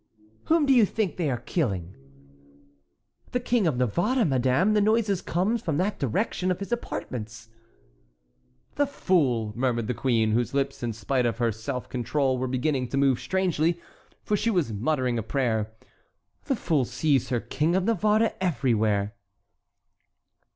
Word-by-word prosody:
"Whom 325 Hz, -2 st, +3 dB
do 275 Hz, -, +4 dB
you 240 Hz, -3 st, +6 dB
think 205 Hz, -1 st, -1 dB
they 165 Hz, -5 st, 0 dB
are 125 Hz, -, 0 dB
killing?" 95 Hz, -, -2 dB, 1.4 s
"The 250 Hz, -, +2 dB
King 240 Hz, -5 st, +1 dB
of 145 Hz, -6 st, 0 dB
Navarre, 175 Hz, -, +1 dB
madame; 135 Hz, -, +2 dB
the 210 Hz, -, +3 dB
noise 210 Hz, -3 st, +2 dB
comes 200 Hz, +7 st, 0 dB
from 155 Hz, -4 st, -1 dB
the 195 Hz, +5 st, +1 dB
direction 185 Hz, -, -1 dB
of 180 Hz, -, 0 dB
his 200 Hz, +3 st, -7 dB
apartments." 115 Hz, -, -5 dB, 1.3 s
"The 285 Hz, 0 st, +2 dB
fool!" 130 Hz, -, +1 dB
murmured 120 Hz, -2 st, 0 dB
the 125 Hz, -, -1 dB
queen, 115 Hz, -3 st, +1 dB
whose 120 Hz, +4 st, 0 dB
lips 140 Hz, 0 st, -1 dB
in 120 Hz, -1 st, -1 dB
spite 120 Hz, +3 st, 0 dB
of 115 Hz, -, -2 dB
her 120 Hz, -1 st, +1 dB
self 120 Hz, +4 st, -5 dB
control 130 Hz, +2 st, 0 dB
were 130 Hz, -, -1 dB
beginning 130 Hz, +1 st, 0 dB
to 135 Hz, -, -3 dB
move 135 Hz, -3 st, +3 dB
strangely, 175 Hz, -3 st, 0 dB, 0.4 s
for 210 Hz, -, 0 dB
she 220 Hz, +3 st, 0 dB
was 175 Hz, -, 0 dB
muttering 125 Hz, +1 st, 0 dB
a -, -, -1 dB
prayer; 110 Hz, -2 st, -1 dB, 0.7 s
"the 275 Hz, -, 0 dB
fool 160 Hz, -, +1 dB
sees 130 Hz, +2 st, 0 dB
her 120 Hz, -, +1 dB
King 155 Hz, +8 st, 0 dB
of 190 Hz, -, +2 dB
Navarre 215 Hz, +1 st, +2 dB
everywhere." 110 Hz, -, +1 dB
140 Hz, 155 wpm, -26 LUFS, 120-190 Hz, 1.4 s, you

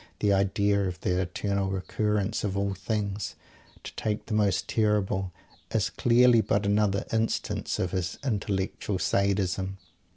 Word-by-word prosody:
The 100 Hz, -1 st, +3 dB
idea 100 Hz, 0 st, +2 dB
of 90 Hz, -1 st, -5 dB
the 90 Hz, 0 st, +1 dB
"Eternal 95 Hz, +2 st, -1 dB
Recurrence 105 Hz, +2 st, -1 dB
of 100 Hz, -2 st, -1 dB
all 100 Hz, 0 st, 0 dB
things" 100 Hz, 0 st, -3 dB, 0.5 s
to -, -, -8 dB
take 105 Hz, 0 st, -2 dB
the 110 Hz, -, -4 dB
most 105 Hz, -3 st, +2 dB
terrible 105 Hz, -3 st, +1 dB, 0.4 s
is -, -, 0 dB
clearly 120 Hz, -1 st, +5 dB
but 105 Hz, 0 st, 0 dB
another 100 Hz, 0 st, +2 dB
instance 110 Hz, 0 st, -1 dB
of 90 Hz, -, -1 dB
his 90 Hz, -2 st, -2 dB
intellectual 100 Hz, -4 st, -1 dB
Sadism. 95 Hz, 0 st, 0 dB
100 Hz, 135 wpm, -27 LUFS, 95-105 Hz, 0.5 s, clearly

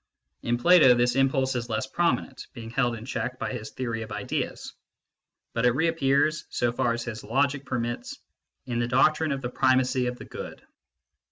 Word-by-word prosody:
In 120 Hz, 0 st, 0 dB
Plato, 155 Hz, -3 st, +6 dB
this 120 Hz, 0 st, +2 dB
impulse 135 Hz, 0 st, +2 dB
is 120 Hz, -1 st, -3 dB
less 110 Hz, +2 st, -1 dB
prominent, 165 Hz, -2 st, -1 dB
being 115 Hz, -3 st, -8 dB
held 120 Hz, -2 st, +1 dB
in 115 Hz, 0 st, -9 dB
check 130 Hz, 0 st, -3 dB
by -, -, -3 dB
his 110 Hz, -3 st, -6 dB
theory 115 Hz, -3 st, -4 dB
of 110 Hz, -1 st, -7 dB
ideas; 105 Hz, -1 st, -4 dB, 0.8 s
but 115 Hz, -, -1 dB
it 125 Hz, -1 st, +4 dB
reappears, 155 Hz, -1 st, +1 dB
so 120 Hz, -1 st, 0 dB
far 120 Hz, 0 st, 0 dB
as 120 Hz, 0 st, -3 dB
his 110 Hz, -2 st, -6 dB
logic 140 Hz, +4 st, 0 dB
permits, 120 Hz, -2 st, -3 dB, 0.5 s
in 120 Hz, -1 st, -2 dB
the 120 Hz, -, 0 dB
doctrine 155 Hz, +5 st, +3 dB
of 135 Hz, -1 st, -3 dB
the 120 Hz, -, -2 dB
primacy 130 Hz, -1 st, +2 dB
of 125 Hz, 0 st, -3 dB
the -, -, -10 dB
Good. -, -, -8 dB
125 Hz, 180 wpm, -26 LUFS, 120-135 Hz, 0.8 s, Plato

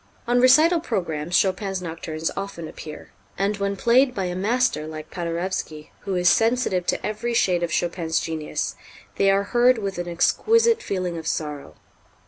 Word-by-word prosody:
On 245 Hz, +1 st, +3 dB
recital 310 Hz, +7 st, +6 dB
programs 175 Hz, -, -3 dB
Chopin's 195 Hz, 0 st, 0 dB
nocturnes 160 Hz, -2 st, -4 dB
often 195 Hz, -4 st, -5 dB
appear, 155 Hz, -1 st, -10 dB, 0.3 s
and, 200 Hz, +2 st, 0 dB
when 200 Hz, 0 st, -1 dB
played 250 Hz, +5 st, +3 dB
by 195 Hz, -3 st, -1 dB
a 180 Hz, 0 st, -3 dB
master 210 Hz, -5 st, 0 dB
like 155 Hz, 0 st, -8 dB
Paderewski, 170 Hz, -3 st, -4 dB
who 195 Hz, -, -4 dB
is 180 Hz, 0 st, +1 dB
sensitive 225 Hz, -5 st, +2 dB
to -, -, -1 dB
every 220 Hz, +3 st, -2 dB
shade 180 Hz, -6 st, +2 dB
of 170 Hz, -1 st, -2 dB
Chopin's 170 Hz, -1 st, -1 dB
genius, 160 Hz, -2 st, -3 dB, 0.4 s
they 195 Hz, -, +3 dB
are 195 Hz, +1 st, +3 dB
heard 245 Hz, +1 st, +5 dB
with 195 Hz, -4 st, -4 dB
an 175 Hz, -, -4 dB
exquisite 455 Hz, -, +2 dB
feeling 180 Hz, -, -3 dB
of 160 Hz, -, -8 dB
sorrow. 150 Hz, -3 st, -4 dB
190 Hz, 160 wpm, -23 LUFS, 165-230 Hz, 0.4 s, recital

